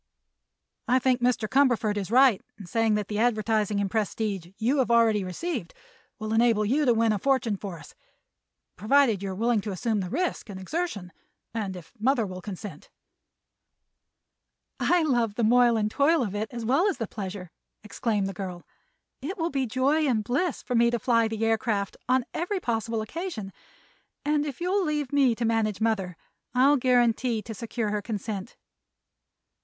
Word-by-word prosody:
I 250 - +4
think 255 -1 +1
Mr. 245 -3 +1
Cumberford 240 -3 +2
is 200 -2 -3
right 250 -3 +5 0.2
in 200 - -10
saying 225 +4 +1
that 210 -2 -2
the 210 0 -3
advertising 215 -3 +1
and 200 - 0
prestige 210 -4 -2
you 255 +6 +1
have 255 - +1
already 225 -3 +4
received 185 - -4 0.4
will 215 0 -4
enable 225 -2 +3
you 285 +8 +2
to 245 - +5
win 225 0 +3
a 210 - 0
fortune 260 -3 +1
for 195 -3 -7
us—provided 215 - -2
you 200 - -3
are 190 - -4
willing 230 +1 +1
to 210 - -5
assume 220 +2 -1
the 185 -2 -3
risk 345 - -2
and 190 -2 -7
exertion, 200 - -4 0.4
and 205 -4 -3
if 175 -3 -12
mother 240 0 +2
will 185 -1 -7
consent." 190 -4 -8 1.9
"I 350 -1 +3
love 240 -8 +1
the 235 - -1
moil 240 +1 +5
and 215 -1 0
toil 295 +3 +3
of 200 -4 -4
it, 210 +1 -3
as 235 -2 -5
well 275 - +3
as 385 - -3
the 225 - -2
pleasure," 190 -4 -7 0.3
exclaimed 215 -1 -1
the 195 - -3
girl. 180 -2 -6 0.6
"It 340 +9 -5
will 335 -1 -1
be 270 -2 -1
joy 275 +6 +1
and 225 -5 +1
bliss 280 - -1
to 250 - -4
me 235 0 +4
to 240 - 0
fly 230 0 +2
the 220 0 -2
aircraft 220 -3 0
on 255 -1 +3
every 365 +4 -2
possible 225 - -2
occasion, 220 - -6 0.7
and 295 0 +1
if 275 - -6
you'll 370 +3 +1
leave 295 -4 -2
me 270 -5 +4
to 235 - -2
manage 220 -3 0
mother 200 -6 -1 0.4
I'll 275 +3 +5
guarantee 245 -2 +2
to 225 - -7
secure 225 0 -3
her 210 0 -1
consent." 210 0 -5
225 Hz, 175 wpm, -26 LUFS, 210-260 Hz, 1.9 s, right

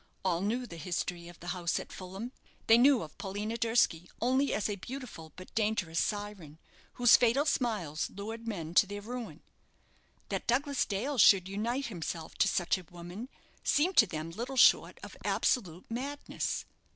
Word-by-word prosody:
All 175 -2 +1
knew 235 +5 -1
the 170 -8 -9
history 175 +1 -3
of 175 -1 -13
the 175 - -6
house 175 -1 -1
at - - -9
Fulham. 195 +6 -7 0.3
They 225 +1 +7
knew 265 -3 +5
of 155 - -11
Paulina 205 +3 -3
Durski 225 -7 +2
only 260 +4 +2
as 210 - 0
a 205 - -2
beautiful, 225 - -8
but 185 - -12
dangerous, 210 -7 0
syren, 205 -8 -3 0.4
whose 245 -2 +7
fatal 250 +4 +3
smiles 210 - -1
lured 225 +3 -7
men 170 -7 -4
to 195 - +6
their 205 +1 -6
ruin. 240 +2 -7 0.9
That - - -3
Douglas 275 +3 +1
Dale 240 +7 -2
should 190 -3 +7
unite 235 +7 -2
himself 170 -5 -5
to - - +5
such 175 +1 +1
a - - -11
woman 175 +8 -8 0.3
seemed 350 +6 +2
to 220 - +8
them 160 -1 -5
little 240 +8 -5
short - - +5
of - - -9
absolute 185 -8 0
madness. 275 +5 -3
210 Hz, 165 wpm, -31 LUFS, 175-240 Hz, 0.9 s, to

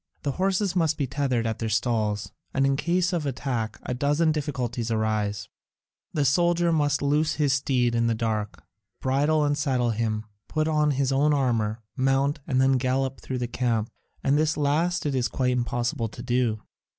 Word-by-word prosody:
The 140 - 0
horses 190 +3 0
must 160 -3 +2
be 140 - 0
tethered 130 -3 -1
at 110 -1 -2
their 115 - -2
stalls, 110 -2 0 0.2
and 135 0 +3
in 135 0 +2
case 175 +5 +1
of 160 -4 -1
attack 125 -4 -3
a - - -3
dozen 145 +5 +2
difficulties 125 -6 -2
arise: 110 -3 -1 0.6
the 145 -2 0
soldier 175 +4 +3
must 145 -2 +1
loose 150 +2 +2
his 145 -3 +2
steed 130 -3 +1
in 115 0 +2
the 115 - +1
dark, 110 -2 -2 0.4
bridle 145 +3 +2
and 145 0 +1
saddle 130 -5 +1
him, 110 -1 -1 0.2
put 155 0 0
on 150 -1 +2
his 140 -1 +1
own 145 +2 +3
armour, 115 -5 0
mount, 135 +2 +1
and 130 -4 +1
then 130 0 +4
gallop 130 +1 -1
through 130 - -4
the 125 -1 -2
camp, 115 -2 -1 0.3
and 140 +2 +3
this 155 0 +1
last 160 +5 +1
it 145 - 0
is 125 -2 +1
quite 125 +1 0
impossible 120 +1 -1
to 105 - -9
do. 120 -3 0
135 Hz, 180 wpm, -26 LUFS, 120-150 Hz, 0.6 s, then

